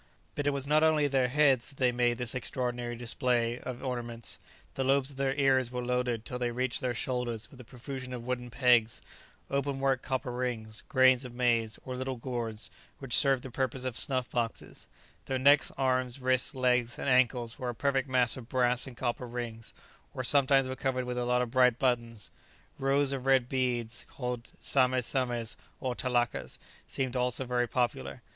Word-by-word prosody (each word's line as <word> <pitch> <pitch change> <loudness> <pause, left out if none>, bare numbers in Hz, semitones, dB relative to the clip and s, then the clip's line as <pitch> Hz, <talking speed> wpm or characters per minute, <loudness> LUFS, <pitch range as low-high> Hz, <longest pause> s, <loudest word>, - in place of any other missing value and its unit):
But 145 -1 -2
it - - +5
was 140 -1 0
not 150 +2 +3
only 155 -2 +4
on 145 - -1
their 130 -2 +3
heads 135 -2 +3
that 140 - -15
they 125 -2 +3
made 120 -1 +1
this 125 -2 -2
extraordinary 120 -1 -3
display 120 0 0
of 125 -1 -7
ornaments; 120 -3 -4 0.3
the 135 - -2
lobes 135 +1 +2
of 135 - -11
their 135 0 0
ears 130 -3 +3
were 125 0 -4
loaded 125 -2 -1
till 125 - -4
they 120 -1 0
reached 125 +1 -2
their 125 -2 -1
shoulders 120 -2 -3
with 130 - -12
a - - -11
profusion 130 +2 -7
of 125 -2 -5
wooden 125 -1 -3
pegs, 120 -3 +3 0.5
open 140 0 -1
work 135 -2 +1
copper 130 -1 -3
rings, 120 -3 -3
grains 130 -1 +5
of 125 -1 -9
maize, 115 -3 +1
or 130 - -4
little 130 +1 -3
gourds, 115 -3 -4 0.3
which 135 -3 0
served 135 -3 +5
the 130 - -7
purpose 130 0 -2
of 130 -3 -3
snuff 130 -1 0
boxes; 115 -2 -4 0.4
their 130 - 0
necks, 140 +3 +5
arms, 130 -1 0
wrists, 130 +1 +1
legs, 125 -2 +1
and - - -4
ankles 125 -1 +2
were 125 -2 -3
a 120 - -4
perfect 135 +1 0
mass 125 -2 +2
of 125 -2 -10
brass 125 -1 +2
and 125 -3 -10
copper 125 +1 -2
rings, 115 -2 -5 0.4
or 130 - -3
sometimes 135 0 +4
were 130 - -4
covered 130 -1 -1
with 125 0 -3
a 120 - -1
lot 125 0 +2
of 120 - -6
bright 125 -2 +4
buttons. 115 -4 -1 0.5
Rows 135 +1 +2
of 135 -1 -4
red 130 -2 +4
beads, 120 -3 -1
called 125 -2 -5
sames 130 -2 +3
sames, 120 -4 -1 0.2
or 130 -1 -2
talakas, 120 -1 -1 0.3
seemed 130 -1 -2
also 125 +1 0
very 120 -1 0
popular. 70 - -2
125 Hz, 190 wpm, -30 LUFS, 120-130 Hz, 0.5 s, it